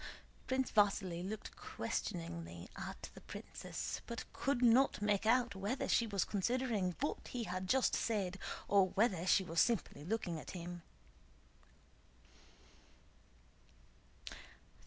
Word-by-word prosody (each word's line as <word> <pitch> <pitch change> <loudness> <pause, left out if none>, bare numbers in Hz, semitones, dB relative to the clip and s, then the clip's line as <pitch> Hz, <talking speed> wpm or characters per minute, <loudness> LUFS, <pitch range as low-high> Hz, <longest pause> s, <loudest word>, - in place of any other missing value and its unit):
Prince 260 0 +1
Vasíli 195 -4 +3
looked 210 +3 -5
questioningly 85 0 -4
at - - -6
the - - -12
princess, - - -5
but 235 -1 -4
could 275 -3 0
not 245 +3 +5
make 210 0 +1
out 240 -2 +4
whether 205 +7 -1
she 230 - +3
was 200 -3 +1
considering 210 -3 0
what 295 - -2
he 245 -2 -3
had 185 -2 -3
just 265 +2 +4
said 195 -4 0 0.3
or 200 -2 +5
whether 190 -4 +2
she 190 - +5
was 165 -2 +2
simply 225 -10 +1
looking 175 -3 -2
at 180 - -7
him. 175 0 -6
200 Hz, 115 wpm, -37 LUFS, 180-235 Hz, 0.3 s, not